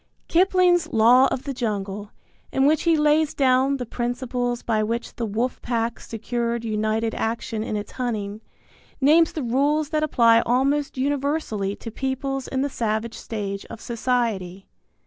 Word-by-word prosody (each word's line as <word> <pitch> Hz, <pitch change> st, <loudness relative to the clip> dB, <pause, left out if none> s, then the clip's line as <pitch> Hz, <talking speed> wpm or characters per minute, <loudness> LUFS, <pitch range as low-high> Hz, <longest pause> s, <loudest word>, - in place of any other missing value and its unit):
Kipling's 355 Hz, -2 st, +3 dB
Law 240 Hz, +4 st, +6 dB
of 255 Hz, -, -3 dB
the 280 Hz, -, -4 dB
Jungle, 205 Hz, -4 st, -3 dB, 0.4 s
in 270 Hz, -, +2 dB
which 305 Hz, +1 st, +3 dB
he 325 Hz, -, +4 dB
lays 300 Hz, 0 st, +2 dB
down 265 Hz, 0 st, +3 dB
the 250 Hz, -, -4 dB
principles 245 Hz, 0 st, -2 dB
by 220 Hz, -2 st, +1 dB
which 230 Hz, +2 st, -3 dB
the 230 Hz, -, -3 dB
wolf 230 Hz, +5 st, -2 dB
pack 235 Hz, -1 st, -2 dB
secured 235 Hz, +1 st, -3 dB
united 220 Hz, +1 st, -1 dB
action 225 Hz, -1 st, -2 dB
in 215 Hz, -, -3 dB
its 205 Hz, 0 st, -6 dB
hunting, 215 Hz, -4 st, -3 dB, 0.6 s
names 310 Hz, +4 st, +5 dB
the 305 Hz, -, -4 dB
rules 285 Hz, +5 st, +1 dB
that 310 Hz, -1 st, 0 dB
apply 230 Hz, -6 st, +4 dB
almost 275 Hz, +4 st, +1 dB
universally 275 Hz, -7 st, -1 dB
to 230 Hz, -, -8 dB
peoples 270 Hz, +2 st, -3 dB
in 265 Hz, -, -1 dB
the -, -, +1 dB
savage 230 Hz, -3 st, -2 dB
stage 200 Hz, -3 st, -4 dB
of -, -, -10 dB
society. 225 Hz, -7 st, -2 dB
240 Hz, 150 wpm, -23 LUFS, 220-275 Hz, 0.6 s, Law